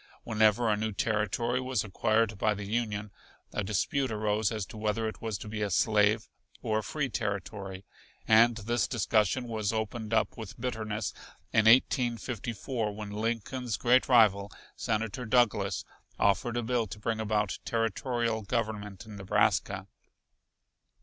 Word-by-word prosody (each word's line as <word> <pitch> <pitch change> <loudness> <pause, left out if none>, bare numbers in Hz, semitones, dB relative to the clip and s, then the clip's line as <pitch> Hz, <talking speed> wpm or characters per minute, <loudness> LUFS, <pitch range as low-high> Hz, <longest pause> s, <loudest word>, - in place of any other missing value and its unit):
Whenever 110 +1 +3
a 105 - +3
new 110 +1 -2
territory 110 +4 0
was 130 -3 -1
acquired 110 +1 +1
by 105 +1 +2
the 100 0 -6
Union 105 -1 -2 0.4
a 110 - -1
dispute 120 +6 0
arose 105 -1 0
as 110 -3 -3
to - - -12
whether 110 +1 -1
it 110 - -6
was 110 -3 -2
to - - -9
be 105 0 -4
a 105 - 0
slave 105 +2 +3 0.4
or 110 -1 +1
a - - -5
free 145 +6 -2
territory, 100 -4 -4 0.4
and 115 +2 +6
this 120 +2 0
discussion 110 +1 +1
was 110 -3 -1
opened 110 0 -3
up 110 -1 +1
with 110 -3 -9
bitterness 110 -4 -3 0.4
in 110 - +4
1854 120 -1 +1
when 105 -1 -6
Lincoln's 115 +2 -2
great 125 +2 +3
rival, 105 -5 +5 0.2
Senator 115 +3 -2
Douglas, 120 -1 +2 0.3
offered 100 +4 +1
a 120 - -1
bill 115 -1 0
to 100 - -8
bring 110 +1 -2
about 105 -2 0
territorial 115 0 -1
government 105 -2 -3
in 105 -2 -10
Nebraska. 95 -1 +1
110 Hz, 145 wpm, -29 LUFS, 105-115 Hz, 0.4 s, and